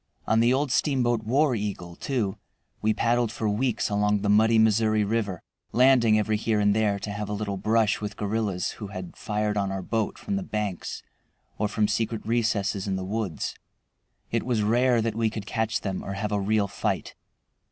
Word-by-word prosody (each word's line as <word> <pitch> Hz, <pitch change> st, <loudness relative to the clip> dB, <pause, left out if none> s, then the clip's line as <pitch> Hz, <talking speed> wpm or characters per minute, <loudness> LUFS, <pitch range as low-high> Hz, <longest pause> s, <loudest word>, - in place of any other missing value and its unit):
On 110 Hz, -, +3 dB
the 120 Hz, +2 st, +4 dB
old 135 Hz, +1 st, +1 dB
steamboat 120 Hz, -5 st, +2 dB
War 135 Hz, +6 st, +2 dB
Eagle, 100 Hz, -6 st, -4 dB
too, 110 Hz, -6 st, -2 dB, 0.4 s
we 110 Hz, -, +2 dB
paddled 120 Hz, +1 st, +1 dB
for 115 Hz, -2 st, -2 dB
weeks 110 Hz, +4 st, 0 dB
along 105 Hz, 0 st, +1 dB
the 100 Hz, 0 st, +2 dB
"Muddy 110 Hz, +2 st, +5 dB
Missouri" 110 Hz, -1 st, +3 dB
River, 100 Hz, -4 st, -2 dB, 0.3 s
landing 125 Hz, -3 st, +5 dB
every 110 Hz, 0 st, +1 dB
here 110 Hz, 0 st, 0 dB
and 105 Hz, 0 st, +3 dB
there 105 Hz, -2 st, +2 dB
to 100 Hz, +1 st, -5 dB
have 105 Hz, 0 st, -4 dB
a -, -, -2 dB
little 100 Hz, -1 st, -2 dB
brush 110 Hz, +2 st, +1 dB
with 105 Hz, -1 st, -5 dB
guerrillas 105 Hz, -3 st, -1 dB
who 105 Hz, -, -4 dB
had 95 Hz, -2 st, -7 dB
fired 105 Hz, 0 st, -1 dB
on 100 Hz, -1 st, 0 dB
our 95 Hz, -1 st, -3 dB
boat 110 Hz, +2 st, -1 dB
from 200 Hz, -1 st, -3 dB
the -, -, -2 dB
banks 105 Hz, -, -4 dB, 0.6 s
or 105 Hz, -, +2 dB
from 105 Hz, 0 st, +1 dB
secret 110 Hz, +1 st, -1 dB
recesses 105 Hz, -4 st, 0 dB
in 95 Hz, -, 0 dB
the 95 Hz, -, -3 dB
woods. 100 Hz, -4 st, -3 dB, 0.8 s
It -, -, +1 dB
was 120 Hz, -3 st, 0 dB
rare 120 Hz, +2 st, +3 dB
that 115 Hz, -1 st, -1 dB
we 115 Hz, 0 st, +1 dB
could 105 Hz, -2 st, -6 dB
catch 110 Hz, 0 st, -1 dB
them 95 Hz, -2 st, -3 dB
or 100 Hz, -, -4 dB
have 105 Hz, +2 st, -3 dB
a 105 Hz, -1 st, 0 dB
real 105 Hz, 0 st, +1 dB
fight. -, -, -2 dB
110 Hz, 195 wpm, -26 LUFS, 100-115 Hz, 0.8 s, Muddy